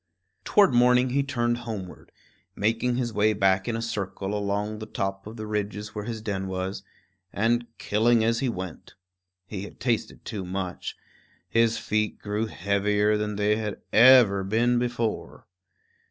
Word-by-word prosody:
Toward 200 -10 +4
morning 125 +1 +4
he 140 +2 +2
turned 120 -4 0
homeward, 110 -6 -7 0.4
making 115 +4 0
his 120 -2 -2
way 110 +1 +3
back 95 -2 +2
in 115 - -1
a 115 - -3
circle 100 -3 -3
along 105 +1 -2
the 110 - -7
top 95 -1 -3
of 110 +2 -9
the 110 - -5
ridge 105 -1 -2
where 105 -1 -6
his 110 -2 -5
den 95 -3 -3
was, 95 +1 -3 0.5
and 120 +3 +1
killing 115 +2 +2
as 115 +1 +1
he 130 - 0
went. 95 -6 -7 0.5
He 100 -1 -6
had 100 - -10
tasted 120 -3 -2
too 105 -5 -4
much; 90 0 -5 0.5
his 115 +3 +2
feet 110 0 -1
grew 105 +2 -2
heavier 105 +2 +1
than 105 0 -2
they 105 +1 +2
had 105 -2 -4
ever 115 -5 +7
been 120 +5 +2
before. 120 -2 -3
110 Hz, 155 wpm, -26 LUFS, 100-120 Hz, 0.5 s, ever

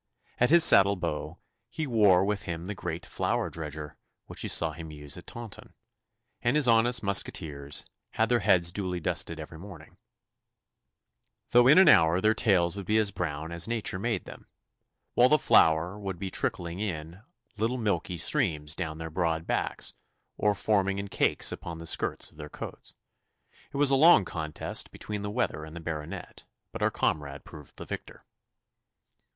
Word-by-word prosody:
At 125 - +4
his 170 +1 +8
saddle 100 0 +7
bow 80 -2 -4 0.3
he 155 +6 -3
bore 105 -7 +4
with 105 +1 -2
him 85 0 -5
the 105 - -4
great 85 -3 -5
flour - - -1
dredger 75 -2 -7 0.3
which - - -8
we - - -3
saw - - +1
him 80 -1 -9
use 75 -1 -7
at 90 - -12
Taunton, 120 -3 -9 0.7
and 120 +3 +1
his 150 -4 +4
honest 115 0 +3
musqueteers 75 -8 -1 0.3
had 110 - +1
their 120 -1 +2
heads 90 -4 +3
duly 90 -2 -3
dusted 80 0 -2
every 80 +1 -9
morning, 90 -4 -12 1.5
though 120 +1 +6
in 150 +5 +7
an 190 - +7
hour 80 +2 +6
their 110 +3 +3
tails 95 -5 +2
would 100 -2 -7
be 110 - +3
as 105 -2 +2
brown 80 -3 -4
as 85 0 -1
nature 115 -5 -2
made 110 -2 -2
them, - - -12 0.7
while 125 +1 +5
the 150 - +5
flour 85 - +3
would 95 -3 -5
be 95 +1 -5
trickling 85 -1 -3
in 85 -3 -5 0.4
little 115 +4 0
milky 105 -5 -1
streams 80 - -1
down 80 -3 -4
their 80 0 -6
broad 80 -1 -1
backs, - - -2 0.4
or 105 -1 +1
forming 100 -1 +1
in 100 0 -5
cakes - - +1
upon 85 -1 -7
the 85 - -9
skirts - - -1
of - - -23
their 75 -1 -8
coats. - - -9 0.7
It - - -6
was 140 -1 +3
a - - +5
long 145 - +6
contest 80 -3 -3
between 105 -1 -6
the 105 - -4
weather 105 -8 -2
and 80 +1 -10
the - - -6
Baronet, 80 -2 -7 0.3
but - - -7
our - - +3
comrade 70 -2 -2
proved 75 -2 -13
the - - -9
victor. - - -8
90 Hz, 175 wpm, -28 LUFS, 80-110 Hz, 1.5 s, his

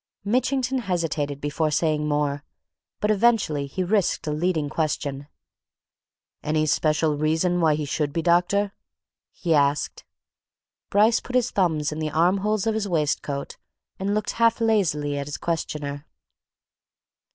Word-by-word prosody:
Mitchington 260 +3 +1
hesitated 165 - -2
before 145 +2 -1
saying 150 0 +1
more. 145 -1 0 0.6
But 210 - +2
eventually 205 -10 +2
he 185 +7 -3
risked 195 -1 +1
a 150 - -1
leading 155 -1 0
question. 145 -2 -2 1.1
"Any 155 0 0
special 155 0 +1
reason 160 +4 +1
why 155 -2 +4
he 150 0 -3
should 145 0 -1
be, 165 +2 -2
doctor?" 180 +4 +2 0.6
he 170 -4 -1
asked. 145 -1 +1 0.9
Bryce 215 +3 +4
put 255 - -7
his 250 -2 +2
thumbs 160 -6 +1
in 150 - -5
the 155 -1 -1
armholes 190 +7 +1
of 225 - +1
his 215 -1 -1
waistcoat 150 -4 -2 0.4
and 200 +2 -1
looked 215 0 -1
half 230 0 +2
lazily 160 -11 +1
at 140 - -5
his 145 - -4
questioner. 150 -3 -4
160 Hz, 135 wpm, -24 LUFS, 150-200 Hz, 1.1 s, why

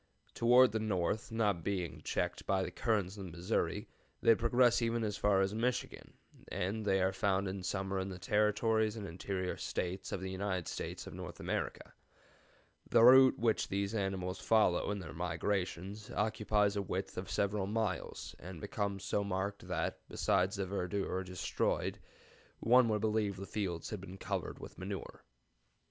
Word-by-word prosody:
Toward 125 +1 +6
the 110 - -1
north, 105 +1 -1
not 105 -7 +1
being 90 -3 -2
checked - - -2
by 95 -1 +2
the - - -4
currents 105 -4 0
of 100 - -6
the - - -7
Missouri, 85 +2 -1 0.3
they 115 - +6
progress 120 +2 +3
even 115 0 0
as 105 -2 -1
far 100 -2 +3
as 95 +1 +1
Michigan, 120 +3 -2 0.3
and 100 +5 -2
they 95 -1 +3
are 95 +1 +2
found 95 0 +1
in 95 0 -4
summer 95 +1 -2
in 95 +1 -3
the 95 - -6
Territories 105 +3 +2
and 105 -3 -5
interior 95 +1 -3
States 90 +2 -3
of - - -2
the 95 0 -4
United 95 -2 -2
States - - -5
of - - -8
North - - -7
America. - - -3 1.0
The 115 -1 +6
route 130 +1 +8
which 115 -2 +1
these 100 +1 -1
animals 95 -3 -2
follow 110 -6 +3
in 105 - -1
their 85 -7 -7
migrations 95 +4 -2
occupies 105 -1 +1
a 100 - 0
width 100 - -3
of - - -5
several 100 -1 0
miles, 105 -4 -2
and 90 -1 -8
becomes 100 +2 -3
so 100 - 0
marked 100 +1 -3
that, - - -2
besides 95 +2 +1
the 100 -1 -1
verdure 95 0 -2
destroyed, 90 -1 -1 0.6
one 125 +1 +5
would 105 -1 +1
believe 105 -2 +1
that 95 - -9
the - - -4
fields 95 -6 -3
had 105 -4 -4
been 95 0 -9
covered - - -3
with - - -10
manure. - - -6
100 Hz, 170 wpm, -34 LUFS, 95-110 Hz, 1.0 s, route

